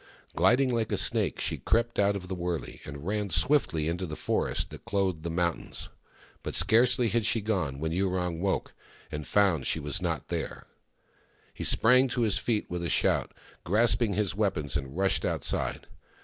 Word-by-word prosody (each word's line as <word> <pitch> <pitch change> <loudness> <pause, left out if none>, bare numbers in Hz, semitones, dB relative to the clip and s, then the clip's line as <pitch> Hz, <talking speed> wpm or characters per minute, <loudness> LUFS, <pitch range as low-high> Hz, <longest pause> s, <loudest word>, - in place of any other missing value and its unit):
Gliding 125 +9 +3
like 115 -2 -1
a - - +1
snake, 105 - +1
she - - -1
crept 115 +1 0
out 100 0 +3
of 90 -2 -6
the 95 - -4
wurlcy, 85 -3 -4
and 70 +1 -8
ran 105 +1 -1
swiftly 90 - +2
into 90 +2 -2
the 75 - -5
forest - - -1
that - - -10
clothed 95 -5 -1
the 85 - -4
mountains. 85 0 -2 0.5
But - - -4
scarcely 120 +1 +4
had 115 +2 +1
she 115 - +2
gone 95 -11 -1
when 80 +2 -2
Yurong 90 -1 -1
woke 95 +1 -1 0.4
and 75 0 -5
found 95 -9 +2
she - - +1
was 75 -2 -2
not - - -2
there. - - -4 0.9
He - - -6
sprang 130 +3 +4
to 125 -1 -2
his 110 -3 +2
feet 110 -3 0
with 85 0 -4
a 85 - -2
shout, - - +1 0.3
grasping 110 +3 +2
his 100 -1 0
weapons, 95 -9 -1
and 70 +2 -3
rushed 95 0 +2
outside. - - -1
95 Hz, 175 wpm, -28 LUFS, 85-110 Hz, 0.9 s, scarcely